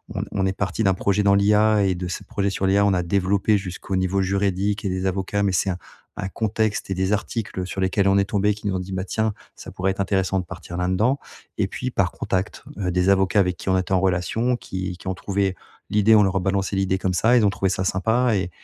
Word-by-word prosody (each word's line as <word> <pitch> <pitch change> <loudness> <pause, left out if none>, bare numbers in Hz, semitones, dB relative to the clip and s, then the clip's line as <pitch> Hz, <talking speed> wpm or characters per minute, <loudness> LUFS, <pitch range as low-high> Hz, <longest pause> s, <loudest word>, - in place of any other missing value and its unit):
on - - -1
on 95 -2 0
est 95 - 0
parti 95 +2 -1
d'un 95 -2 +4
projet 100 +2 +1
dans 100 0 +5
l'IA 105 +1 +4
et 95 -2 +1
de 90 0 -4
ce 85 - -5
projet 100 0 -1
sur 95 - -2
l'IA, 100 +1 +4
on 100 - +3
a 90 - +1
développé 100 +3 +2
jusqu'au 95 0 -5
niveau 95 +1 +1
juridique 100 +2 0
et - - +1
des 95 +1 -2
avocats, 95 +2 -1
mais 100 - +2
c'est 95 - +1
un 90 - -4 0.4
un 95 - -3
contexte 110 0 -1
et - - 0
des 95 +2 0
articles 105 -3 -3
sur 95 - -5
lesquels 95 +1 +2
on 100 - +4
est 100 - +3
tombés 105 +1 +1
qui 105 - -13
nous 95 - 0
ont 95 - -1
dit: 90 +1 -7
«Bah 95 - -2
tiens 110 0 -1 0.2
ça - - -10
pourrait 95 +1 -1
être 95 - -8
intéressant 95 -1 0
de 90 - -4
partir 85 - -9
là-dedans» 95 +10 +1 0.4
et - - +2
puis - - -4
par - - +1
contact, 95 +2 -3 0.2
heu, 90 - -1
des 90 +1 +2
avocats 95 +1 +3
avec 90 -2 +1
qui - - -5
on 95 - +3
était 95 0 -3
en 95 - +4
relation 95 +7 +1
qui 95 -4 -5
qui - - -12
ont 95 - 0
trouvé 95 0 -1 0.4
l'idée, 105 +1 +5
on 105 - +6
leur 95 0 0
a - - +2
balancé 95 +1 -1
l'idée 95 -1 +1
comme 95 -1 -1
ça, 115 +7 +4
ils 110 - +4
ont 100 - +5
trouvé 100 -1 0
ça 95 0 -1
sympa 110 +5 +1
et 95 -2 -1
95 Hz, 260 wpm, -23 LUFS, 95-100 Hz, 0.4 s, on